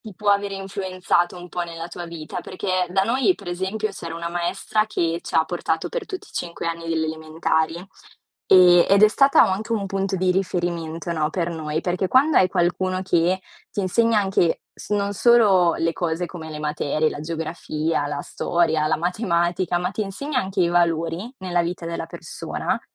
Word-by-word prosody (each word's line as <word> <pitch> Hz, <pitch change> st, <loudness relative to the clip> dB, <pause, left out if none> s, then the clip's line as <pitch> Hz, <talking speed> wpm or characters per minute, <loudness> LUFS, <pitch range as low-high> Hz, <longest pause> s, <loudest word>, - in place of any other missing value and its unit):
ti 215 Hz, -4 st, -11 dB
può 205 Hz, +1 st, +1 dB
avere 200 Hz, 0 st, +1 dB
influenzato 185 Hz, -2 st, -1 dB
un 175 Hz, 0 st, -9 dB
po' 175 Hz, +1 st, -3 dB
nella 170 Hz, 0 st, -6 dB
tua 175 Hz, -1 st, -7 dB
vita, 165 Hz, -2 st, -6 dB
perché 185 Hz, -1 st, -2 dB
da 195 Hz, +1 st, +2 dB
noi, 260 Hz, -, +2 dB
per -, -, -11 dB
esempio, 190 Hz, +4 st, -2 dB
c'era 165 Hz, -3 st, -7 dB
una 170 Hz, 0 st, -4 dB
maestra 175 Hz, +5 st, -1 dB
che 170 Hz, -6 st, -1 dB
c'ha 160 Hz, -, +1 dB
portato 165 Hz, -2 st, -2 dB
per -, -, -4 dB
tutti 395 Hz, 0 st, -7 dB
i -, -, -19 dB
5 170 Hz, -1 st, -4 dB
anni 165 Hz, 0 st, -5 dB
delle 160 Hz, -1 st, 0 dB
elementari, 160 Hz, +1 st, -1 dB, 0.7 s
ehm, 180 Hz, -2 st, +7 dB
ed 200 Hz, +1 st, +5 dB
è -, -, +10 dB
stata 275 Hz, +6 st, +5 dB
anche 205 Hz, +4 st, -1 dB
un 210 Hz, -3 st, 0 dB
punto 195 Hz, 0 st, -2 dB
di 185 Hz, +1 st, +1 dB
riferimento, 175 Hz, -3 st, -2 dB
no, 155 Hz, -1 st, 0 dB
per 175 Hz, 0 st, -2 dB
noi, 155 Hz, -1 st, -3 dB
perché 180 Hz, +1 st, -1 dB
quando 280 Hz, +4 st, +4 dB
hai 185 Hz, -, +5 dB
qualcuno 185 Hz, +2 st, 0 dB
che 180 Hz, 0 st, +2 dB, 0.3 s
t'insegna 215 Hz, +3 st, +2 dB
anche 190 Hz, -4 st, +1 dB
s -, -, -12 dB
non 205 Hz, -1 st, 0 dB
solo 200 Hz, -7 st, +5 dB
le 165 Hz, 0 st, 0 dB
cose 170 Hz, 0 st, -2 dB
come 165 Hz, -3 st, -8 dB
le 155 Hz, -1 st, -6 dB
materie, 150 Hz, 0 st, 0 dB
la -, -, -7 dB
geografia, 160 Hz, -1 st, -2 dB
la 145 Hz, 0 st, -3 dB
storia, 160 Hz, -2 st, 0 dB
la -, -, +2 dB
matematica, 175 Hz, -1 st, 0 dB
ma 180 Hz, +1 st, -2 dB
t'insegna 220 Hz, +8 st, -2 dB
anche 190 Hz, -4 st, -1 dB
i 170 Hz, -, +3 dB
valori 170 Hz, +5 st, 0 dB
nella 180 Hz, -2 st, 0 dB
vita 175 Hz, +1 st, -4 dB
della 170 Hz, 0 st, -4 dB
persona, -, -, -4 dB
175 Hz, 180 wpm, -23 LUFS, 165-195 Hz, 0.7 s, è